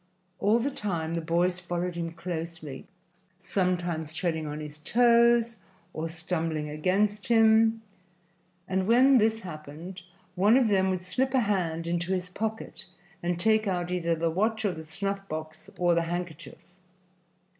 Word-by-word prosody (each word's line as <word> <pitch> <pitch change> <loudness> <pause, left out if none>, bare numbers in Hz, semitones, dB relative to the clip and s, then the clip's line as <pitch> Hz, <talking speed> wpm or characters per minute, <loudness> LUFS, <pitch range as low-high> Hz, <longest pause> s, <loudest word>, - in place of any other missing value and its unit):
All 210 +3 +3
the 260 +5 -1
time 170 -9 -3
the 170 - -1
boys 175 +2 +1
followed 175 0 -3
him 170 -1 -4
closely, 165 -4 -6 0.5
sometimes 175 -5 -1
treading 160 -2 -1
on 150 +1 -5
his 150 0 -7
toes 235 +4 +4 0.4
or 160 +1 -3
stumbling 160 -2 -2
against 195 +6 0
him, 225 -1 +4 0.8
and 190 0 0
when 255 +3 +6
this 220 +1 +2
happened 165 +2 -8 0.3
one 205 +6 +4
of 250 -4 +3
them 190 -2 +3
would 185 -1 -2
slip 260 +9 0
a 260 - +4
hand 175 -6 -1
into 175 +2 -1
his 180 -1 -3
pocket 220 +3 -5 0.4
and 175 0 -1
take 220 +2 +3
out 180 -2 -1
either 170 -2 0
the 165 0 0
watch 220 +5 0
or 200 - +2
the 160 -1 -8
snuff 195 +4 -4
box 155 0 -7
or 175 -1 +3
the 170 - +2
handkerchief. 175 0 -6
180 Hz, 150 wpm, -28 LUFS, 165-210 Hz, 0.8 s, when